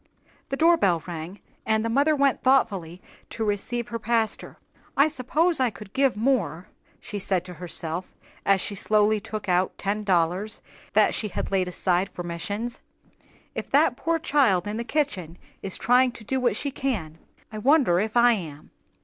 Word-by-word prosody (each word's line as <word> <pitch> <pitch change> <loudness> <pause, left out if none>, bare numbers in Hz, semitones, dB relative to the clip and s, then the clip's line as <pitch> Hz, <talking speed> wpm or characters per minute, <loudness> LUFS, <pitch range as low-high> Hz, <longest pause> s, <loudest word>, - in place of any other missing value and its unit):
The 275 - -2
doorbell 275 - +3
rang, 175 +2 -7 0.2
and 220 0 +1
the - - +1
mother 285 +6 +3
went 280 -2 +2
thoughtfully 195 -10 +1 0.3
to 225 - -4
receive 235 +3 -2
her 230 -1 -4
pastor. 225 -1 -1 0.4
"I 280 +2 +6
suppose 310 +4 0
I 255 -2 +3
could 205 -2 -12
give 270 -4 +2
more," 210 - 0 0.3
she 205 - -6
said 185 -2 0
to 180 - -8
herself, 170 +1 -4 0.3
as 195 -1 +3
she - - -4
slowly 210 +2 +2
took 215 0 -6
out 180 0 +1
the - - -11
ten 205 +2 -1
dollars 185 +2 0 0.3
that - - +4
she 215 - -2
had 200 - -4
laid 190 -2 +1
aside 180 +1 0
for 175 - -7
missions. 200 +8 -4 0.7
"If - - -5
that - - +4
poor 330 0 0
child 265 - +2
in 210 +1 -3
the 235 - -2
kitchen 200 - -2 0.2
is 195 - -2
trying 250 0 +3
to 235 - -11
do 265 +5 -1
what 240 -5 +1
she 280 +5 -2
can, 195 - -3 0.3
I 215 - -6
wonder 255 - +4
if 220 +4 -1
I 240 0 +6
am. 160 -9 -5
215 Hz, 175 wpm, -25 LUFS, 180-255 Hz, 0.7 s, I